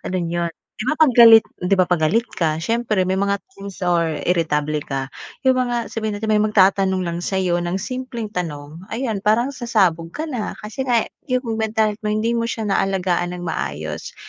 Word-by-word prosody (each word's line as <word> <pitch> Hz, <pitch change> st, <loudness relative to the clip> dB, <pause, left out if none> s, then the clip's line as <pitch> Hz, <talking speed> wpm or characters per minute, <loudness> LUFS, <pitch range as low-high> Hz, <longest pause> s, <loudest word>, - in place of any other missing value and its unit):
ganun 175 Hz, -2 st, -3 dB
yun. 170 Hz, -1 st, -1 dB, 0.3 s
'Di 215 Hz, -, -4 dB
ba 305 Hz, -, +2 dB
'pag 310 Hz, -2 st, +4 dB
galit 230 Hz, -2 st, +9 dB, 0.2 s
'di 180 Hz, +2 st, +1 dB
ba 185 Hz, -1 st, +2 dB
pag 175 Hz, -, +3 dB
galit 225 Hz, +8 st, +2 dB, 0.2 s
ka, 160 Hz, -3 st, +1 dB
siyempre 225 Hz, -1 st, 0 dB
may 190 Hz, +1 st, 0 dB
mga 200 Hz, 0 st, 0 dB
things 200 Hz, -4 st, -10 dB
or 170 Hz, -3 st, +1 dB
iritable 155 Hz, -3 st, 0 dB
ka, 135 Hz, 0 st, -3 dB, 0.3 s
yung 260 Hz, -1 st, +3 dB
mga 240 Hz, -2 st, -1 dB
sabihin 220 Hz, -2 st, -3 dB
natin 215 Hz, +1 st, -3 dB
may 215 Hz, -, +4 dB
magtatanong 195 Hz, -3 st, +3 dB
lang 170 Hz, -1 st, -3 dB
sa'yo 180 Hz, -1 st, 0 dB
ng 175 Hz, +1 st, -2 dB
simpleng 255 Hz, -4 st, -5 dB
tanong, 160 Hz, -1 st, -6 dB
ayun 230 Hz, -4 st, -2 dB
parang 220 Hz, +6 st, +2 dB
sasabog 195 Hz, -11 st, 0 dB
ka 305 Hz, -, -3 dB
na 235 Hz, -5 st, -3 dB
kasi 260 Hz, +5 st, -5 dB
nga 235 Hz, -3 st, +3 dB, 0.2 s
yung 255 Hz, -2 st, 0 dB, 0.2 s
mental 220 Hz, -1 st, +1 dB
health 210 Hz, -, -9 dB
mo, 210 Hz, -, +1 dB
hindi 220 Hz, +2 st, 0 dB
mo 230 Hz, -1 st, 0 dB
siya 220 Hz, -3 st, -3 dB
naalagaan 180 Hz, -2 st, 0 dB
ng 175 Hz, -, -7 dB
maayos. 75 Hz, -, -4 dB
200 Hz, 195 wpm, -21 LUFS, 175-225 Hz, 0.3 s, galit